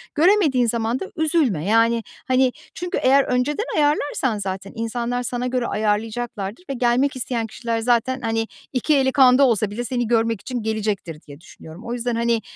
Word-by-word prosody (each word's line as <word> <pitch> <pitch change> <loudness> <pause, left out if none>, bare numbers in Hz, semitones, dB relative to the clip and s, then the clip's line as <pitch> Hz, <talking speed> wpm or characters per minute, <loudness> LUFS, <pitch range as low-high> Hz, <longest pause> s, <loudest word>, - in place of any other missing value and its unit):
Göremediğin 310 - +4
zaman 230 +2 -1
da - - -4
üzülme, 305 - +1
yani, 230 +2 +3 0.2
hani, 255 0 +3 0.2
çünkü 355 0 -3
eğer 275 +1 +5
önceden 270 - 0
ayarlarsan, 290 -6 +1
zaten 195 0 -5
insanlar 235 +2 -2
sana 245 0 -2
göre 250 -1 -1
ayarlayacaklardır 215 - -2
ve - - -1
gelmek 255 +3 +1
isteyen 240 -3 -2
kişiler 230 +1 -3
zaten, 245 +2 +1
hani, 225 -1 -1 0.3
iki 285 +4 +2
eli 265 -1 +2
kanda 265 0 +6
olsa 215 -3 +1
bile 240 +3 -4
seni 240 -1 -2
görmek 230 -3 +1
için 250 -3 -4
gelecektir 210 -7 -3
diye 145 -1 -13
düşünüyorum. 165 +2 -13
O 235 - -4
yüzden, 245 0 -2
hani, 235 -1 +1
240 Hz, 165 wpm, -22 LUFS, 225-260 Hz, 0.3 s, kanda